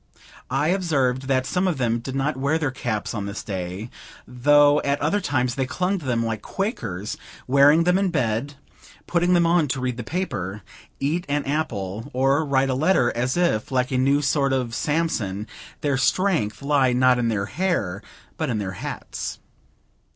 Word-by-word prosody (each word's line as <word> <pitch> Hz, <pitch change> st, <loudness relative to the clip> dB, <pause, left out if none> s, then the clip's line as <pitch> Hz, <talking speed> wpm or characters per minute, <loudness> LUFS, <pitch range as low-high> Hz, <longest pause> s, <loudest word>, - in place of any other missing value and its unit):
I 150 Hz, -, +1 dB
observed 135 Hz, -9 st, 0 dB
that 130 Hz, -1 st, +1 dB
some 180 Hz, +8 st, 0 dB
of 175 Hz, -5 st, 0 dB
them 120 Hz, -2 st, 0 dB
did 130 Hz, +3 st, -6 dB
not 135 Hz, +2 st, 0 dB
wear 140 Hz, +4 st, +1 dB
their 150 Hz, -4 st, -1 dB
caps 110 Hz, -5 st, -3 dB
on 105 Hz, -3 st, -3 dB
this 100 Hz, +1 st, -5 dB
day, 95 Hz, +3 st, -5 dB, 0.4 s
though 145 Hz, +4 st, +4 dB
at 140 Hz, 0 st, 0 dB
other 180 Hz, +8 st, +1 dB
times 125 Hz, -8 st, 0 dB
they 130 Hz, 0 st, -1 dB
clung 185 Hz, +7 st, -1 dB
to 155 Hz, -, -11 dB
them 115 Hz, -2 st, +1 dB
like 110 Hz, -2 st, -3 dB
Quakers; 150 Hz, -, -4 dB, 0.3 s
wearing 140 Hz, +5 st, +5 dB
them 180 Hz, +2 st, +3 dB
in 195 Hz, -1 st, +1 dB
bed, 130 Hz, -2 st, -1 dB, 0.5 s
putting 175 Hz, +1 st, +2 dB
them 175 Hz, -1 st, +4 dB
on 165 Hz, -2 st, +3 dB
to 130 Hz, 0 st, -2 dB
read 125 Hz, -1 st, -2 dB
the 120 Hz, -, -4 dB
paper, 105 Hz, -, -4 dB, 0.4 s
eat 155 Hz, +6 st, 0 dB
an 145 Hz, 0 st, 0 dB
apple, 115 Hz, -8 st, -3 dB
or 135 Hz, +4 st, +2 dB
write 135 Hz, -2 st, +1 dB
a -, -, +1 dB
letter, 140 Hz, -2 st, +2 dB
as 125 Hz, +5 st, 0 dB
if, 170 Hz, -10 st, +1 dB
like 125 Hz, 0 st, 0 dB
a 130 Hz, -, +1 dB
new 140 Hz, +3 st, +3 dB
sort 140 Hz, 0 st, +2 dB
of 125 Hz, -3 st, -1 dB
Samson, 120 Hz, -, -1 dB, 0.4 s
their 140 Hz, -2 st, +1 dB
strength 140 Hz, -, +1 dB
lay, 140 Hz, -3 st, +3 dB
not 125 Hz, 0 st, +4 dB
in 120 Hz, -, +1 dB
their 105 Hz, -3 st, 0 dB
hair, 110 Hz, -, -1 dB, 0.4 s
but 155 Hz, -3 st, -1 dB
in 115 Hz, -, 0 dB
their 100 Hz, -3 st, -3 dB
hats. -, -, -5 dB
135 Hz, 180 wpm, -23 LUFS, 120-155 Hz, 0.5 s, wearing